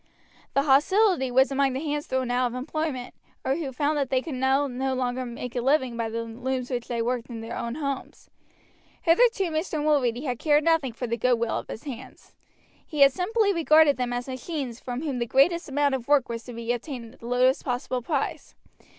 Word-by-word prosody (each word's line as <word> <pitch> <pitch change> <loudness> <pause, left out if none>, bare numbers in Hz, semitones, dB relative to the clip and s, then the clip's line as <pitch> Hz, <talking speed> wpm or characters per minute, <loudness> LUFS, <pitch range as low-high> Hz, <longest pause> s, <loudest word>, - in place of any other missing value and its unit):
The 275 - +4
hostility 300 +2 +3
was 260 +2 +4
among 275 -1 +2
the 260 - -2
hands 295 -1 -3
thrown 260 -1 -1
out 250 0 +2
of 240 - -6
employment, 260 -1 -3 0.3
or 265 - +2
who 300 -5 -4
found 290 +3 0
that 275 -2 -1
they 260 - +2
could 320 - -5
now 265 +2 +2
no 265 0 -2
longer 255 0 -2
make 240 +1 -7
a 245 - 0
living 260 -2 +2
by 230 -1 -2
the 230 +1 -3
looms 250 +3 -4
which 245 -2 -3
they 235 -2 -1
worked 245 0 -2
in 230 -2 -6
their 225 +1 -6
own 235 0 -4
homes. 280 -3 -5 0.8
Hitherto 385 0 +3
Mr. 315 +1 -2
Mulready 265 -5 +1
had 250 -5 -3
cared 300 -1 +3
nothing 325 -5 +2
for 245 - -4
the 235 0 -2
goodwill 235 -1 +1
of - - -10
his 220 - -7
hands. 260 -3 -9 0.5
He 300 -2 -4
had 275 -1 +8
simply 405 - +1
regarded 315 -3 +5
them 250 -1 -2
as 245 +1 -3
machines 260 -2 -5
from 250 +3 -5
whom 275 -5 -2
the 235 - -1
greatest 335 +7 +3
amount 285 0 +1
of 255 -3 -3
work 285 -4 +3
was 230 0 -4
to 245 - -8
be 235 +1 -2
obtained 245 -2 -6
at - - -20
the 230 - -9
lowest 255 +2 +2
possible 250 0 -2
price. 280 +2 -3
260 Hz, 210 wpm, -26 LUFS, 245-295 Hz, 0.8 s, had